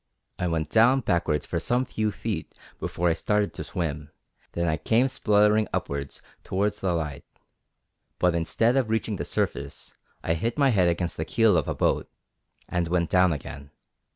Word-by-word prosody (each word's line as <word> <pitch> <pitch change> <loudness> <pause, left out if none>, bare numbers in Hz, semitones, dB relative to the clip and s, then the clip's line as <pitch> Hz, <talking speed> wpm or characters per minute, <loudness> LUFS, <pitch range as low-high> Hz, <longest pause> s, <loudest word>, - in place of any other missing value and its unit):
I 90 - 0
went 80 -2 -2
down 125 +4 +5
backwards 85 - 0
for - - -2
some 125 +2 0
few 110 -3 -1
feet 100 - -5 0.2
before 90 - -1
I - - +3
started 105 +4 0
to - - -5
swim, 75 -5 -4 0.4
then 85 0 -1
I 80 0 +1
came 115 +8 +2
spluttering 105 -3 +3
upwards 70 -1 -4 0.2
towards 105 +2 -1
the 95 -2 +1
light; 75 -4 -3 0.9
but, 90 -1 +2
instead 110 +9 +1
of 125 -5 +1
reaching 110 -2 -1
the - - -4
surface, 70 0 -3 0.3
I 80 - +1
hit 115 - -2
my 140 -2 +4
head 95 -7 +3
against 85 0 -2
the 80 - -1
keel 110 -2 +3
of 80 -5 +1
a - - -2
boat - - 0 0.6
and 90 -1 -1
went 85 -1 0
down 90 -1 +4
again. 70 -1 -6
90 Hz, 175 wpm, -26 LUFS, 80-110 Hz, 0.9 s, down